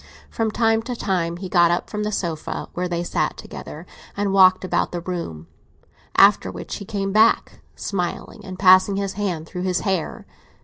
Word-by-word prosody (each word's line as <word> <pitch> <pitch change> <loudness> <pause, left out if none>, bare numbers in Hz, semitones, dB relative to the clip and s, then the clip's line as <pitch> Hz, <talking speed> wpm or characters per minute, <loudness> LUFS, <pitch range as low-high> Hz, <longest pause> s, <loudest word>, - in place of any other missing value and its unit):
From 225 -1 -1
time 225 0 +2
to 245 +2 -5
time 175 -6 -1
he 185 +1 -6
got 175 -2 +4
up 175 - -1
from 210 - -4
the 210 0 -2
sofa 170 -6 -4
where 180 +1 -2
they 175 -1 -2
sat - - -1
together, - - -9 0.3
and 200 -1 0
walked 185 -1 +5
about - - 0
the 175 - -4
room; 170 - -5 0.7
after 95 - +5
which 90 -1 -6
he 200 - -8
came 195 -2 -3
back, 220 +3 +3 0.2
smiling 195 +3 -4
and 185 -2 -8
passing 185 +1 +5
his 195 -1 -2
hand 185 -6 -3
through 180 +2 -7
his 185 0 0
hair. 190 -6 -2
185 Hz, 180 wpm, -22 LUFS, 175-205 Hz, 0.7 s, walked